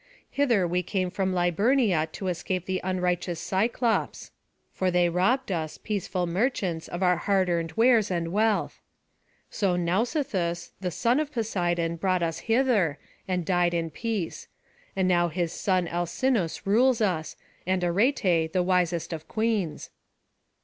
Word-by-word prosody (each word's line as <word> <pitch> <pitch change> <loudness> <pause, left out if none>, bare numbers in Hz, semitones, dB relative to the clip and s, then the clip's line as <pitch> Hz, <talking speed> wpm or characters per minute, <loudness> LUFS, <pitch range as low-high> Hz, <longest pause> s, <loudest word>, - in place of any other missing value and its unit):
Hither 235 -10 +2
we 180 +1 0
came 185 0 -2
from 190 0 -1
Liburnia 185 - +2
to 190 - -5
escape 180 0 -2
the 185 -1 -2
unrighteous 180 -2 -1
Cyclopes; 225 +6 -1 0.4
for 185 - 0
they 175 -1 +3
robbed 195 +8 +1
us, 160 -3 -3
peaceful 190 -3 -2
merchants, 180 -3 -1
of 175 +2 -4
our 180 -1 +3
hard 190 0 +1
earned 165 -2 -1
wares 230 -1 +4
and 170 -2 -1
wealth. 215 +2 0 0.7
So 190 -4 0
Nausithous, 185 - -1
the 180 - -1
son 235 - +1
of 305 -1 -2
Poseidon, 175 - -1
brought 185 0 +1
us 165 -1 -2
hither, 225 - +2 0.3
and 180 -2 -1
died 175 -1 +2
in 165 -1 -2
peace; 210 -1 -4 0.5
and 190 -1 +1
now 175 -1 +3
his 170 0 -2
son 185 -3 0
Alcinous 175 0 -1
rules 240 +5 +3
us, 180 -7 -1 0.3
and 185 -1 +1
Arete 175 - +2
the 185 -1 +2
wisest 175 -2 0
of 160 -1 -7
queens." 215 -7 -2
185 Hz, 140 wpm, -26 LUFS, 170-215 Hz, 0.7 s, wares